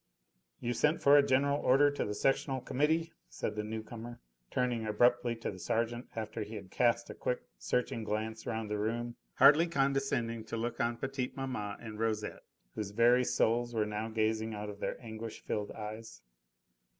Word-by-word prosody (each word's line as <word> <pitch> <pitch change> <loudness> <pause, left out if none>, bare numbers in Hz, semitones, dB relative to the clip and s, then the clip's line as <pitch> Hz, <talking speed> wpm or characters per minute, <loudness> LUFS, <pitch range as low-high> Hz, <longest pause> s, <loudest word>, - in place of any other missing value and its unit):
"You 120 - -1
sent 150 +5 +2
for 140 +1 +6
a 145 - +9
general 140 +1 +2
order 145 +3 +5
to 145 - -2
the 105 - -3
sectional 135 +2 +1
Committee," 160 +6 0 0.2
said 105 - -3
the 105 - -2
new 110 +1 -4
comer, 120 +2 -8 0.3
turning 125 -3 0
abruptly 120 +2 +3
to 115 - -4
the 95 - -10
sergeant 115 +4 -1
after 110 0 -4
he 105 +1 -5
had 100 -3 -8
cast 120 -1 +2
a - - -6
quick, 125 - -2 0.2
searching 115 - -1
glance 110 +1 -3
round 110 -1 -2
the 105 - -1
room, 120 +3 -2 0.2
hardly 150 +5 +7
condescending 135 -6 0
to 115 - -4
look 115 +1 -3
on 120 0 0
petite 135 -1 -3
maman 125 -7 -3
and 110 -2 -8
Rosette, 110 -2 -1 0.3
whose 105 -2 -3
very 120 +4 +5
souls 120 0 +1
were 110 -1 +2
now 105 +1 -3
gazing 110 0 0
out 105 0 -4
of 100 - -12
their - - -3
anguish 110 0 -7
filled 105 -1 -2
eyes. 110 - -8
115 Hz, 180 wpm, -32 LUFS, 110-125 Hz, 0.3 s, a